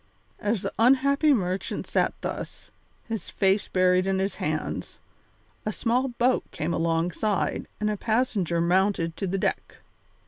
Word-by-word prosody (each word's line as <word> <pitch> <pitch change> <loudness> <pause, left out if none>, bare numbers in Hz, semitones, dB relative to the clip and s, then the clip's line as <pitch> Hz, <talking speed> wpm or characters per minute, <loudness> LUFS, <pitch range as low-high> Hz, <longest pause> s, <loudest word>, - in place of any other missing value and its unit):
As 210 -1 -1
the - - -3
unhappy 280 +5 +4
merchant 185 -7 -1
sat - - +1
thus, - - -6 0.4
his 225 -5 -4
face 195 +1 +2
buried 185 0 +3
in 195 0 +1
his 195 +1 0
hands, 155 0 -3 0.7
a 215 - -1
small 245 +4 +1
boat 245 0 +1
came 160 +3 -3
alongside 170 +5 0
and 210 - 0
a 210 -1 0
passenger 215 -7 0
mounted 175 -1 +2
to 195 - -2
the 190 +2 -1
deck. - - -2
195 Hz, 140 wpm, -26 LUFS, 180-230 Hz, 0.7 s, unhappy